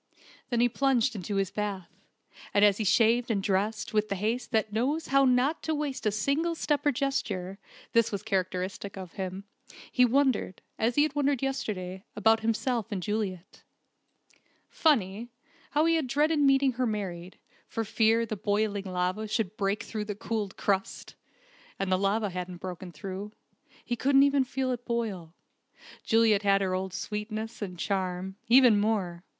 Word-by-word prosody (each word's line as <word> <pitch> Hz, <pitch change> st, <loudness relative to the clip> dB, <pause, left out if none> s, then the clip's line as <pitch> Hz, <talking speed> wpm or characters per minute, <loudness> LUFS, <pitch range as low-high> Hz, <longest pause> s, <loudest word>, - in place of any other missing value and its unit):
Then 240 Hz, -2 st, +1 dB
he 245 Hz, -, +5 dB
plunged 255 Hz, -1 st, +1 dB
into 200 Hz, +1 st, -4 dB
his 195 Hz, 0 st, 0 dB
bath, 200 Hz, -4 st, -4 dB, 0.6 s
and 205 Hz, +1 st, +6 dB
as 205 Hz, -1 st, +4 dB
he 220 Hz, -, -1 dB
shaved 230 Hz, +4 st, +3 dB
and 200 Hz, -4 st, 0 dB
dressed 205 Hz, +4 st, -1 dB
with 215 Hz, 0 st, +1 dB
the 200 Hz, -, -1 dB
haste 220 Hz, +6 st, -2 dB
that 220 Hz, -3 st, 0 dB
knows 280 Hz, +9 st, -1 dB
how 275 Hz, 0 st, +5 dB
not 255 Hz, +5 st, +2 dB
to 315 Hz, -, -1 dB
waste 285 Hz, -6 st, -2 dB
a -, -, +3 dB
single 280 Hz, +11 st, 0 dB
step 295 Hz, -2 st, 0 dB
or -, -, +5 dB
gesture 200 Hz, -9 st, -2 dB, 0.3 s
(this 230 Hz, -1 st, +3 dB
was 200 Hz, -1 st, -4 dB
characteristic 190 Hz, -1 st, -2 dB
of 185 Hz, -3 st, -7 dB
him) 190 Hz, 0 st, -5 dB, 0.5 s
he 250 Hz, -, +4 dB
wondered, 255 Hz, -6 st, +1 dB, 0.2 s
as 230 Hz, +2 st, +1 dB
he 290 Hz, -, +5 dB
had 305 Hz, -2 st, -1 dB
wondered 285 Hz, -2 st, +1 dB
yesterday, 195 Hz, -9 st, -3 dB
about 220 Hz, +2 st, +4 dB
himself 230 Hz, +1 st, -1 dB
and 190 Hz, -3 st, -3 dB
Juliet. 195 Hz, -3 st, -4 dB, 1.1 s
Funny, 230 Hz, -, +1 dB, 0.4 s
how 300 Hz, +2 st, +2 dB
he 330 Hz, -, +3 dB
had 305 Hz, -5 st, -1 dB
dreaded 295 Hz, +4 st, +2 dB
meeting 275 Hz, -1 st, +4 dB
her 250 Hz, 0 st, -1 dB
married, 185 Hz, -4 st, -4 dB, 0.3 s
for 225 Hz, -, -3 dB
fear 225 Hz, +1 st, +2 dB
the 215 Hz, -, -4 dB
boiling 205 Hz, 0 st, -1 dB
lava 185 Hz, +3 st, -2 dB
should 215 Hz, -2 st, -1 dB
break 200 Hz, +1 st, -1 dB
through 215 Hz, -2 st, -4 dB
the 205 Hz, -1 st, -4 dB
cooled 210 Hz, -2 st, -3 dB
crust! 195 Hz, -1 st, -2 dB, 0.6 s
And 195 Hz, -1 st, -2 dB
the 185 Hz, -, +3 dB
lava 200 Hz, +1 st, +1 dB
hadn't 180 Hz, 0 st, -5 dB
broken 180 Hz, 0 st, -7 dB
through. 190 Hz, +6 st, -7 dB, 0.5 s
He 240 Hz, -, -1 dB
couldn't 275 Hz, +3 st, +4 dB
even 280 Hz, -1 st, +3 dB
feel 260 Hz, 0 st, -2 dB
it 245 Hz, -1 st, -4 dB
boil. 205 Hz, -9 st, -3 dB, 0.7 s
Juliet 225 Hz, -3 st, +4 dB
had 200 Hz, -1 st, +3 dB
her 190 Hz, -1 st, 0 dB
old 190 Hz, 0 st, -2 dB
sweetness, 215 Hz, +2 st, -5 dB
and 180 Hz, -3 st, -5 dB
charm 190 Hz, 0 st, -2 dB
even 245 Hz, -4 st, +7 dB
more. 195 Hz, -5 st, -1 dB
215 Hz, 165 wpm, -28 LUFS, 195-250 Hz, 1.1 s, even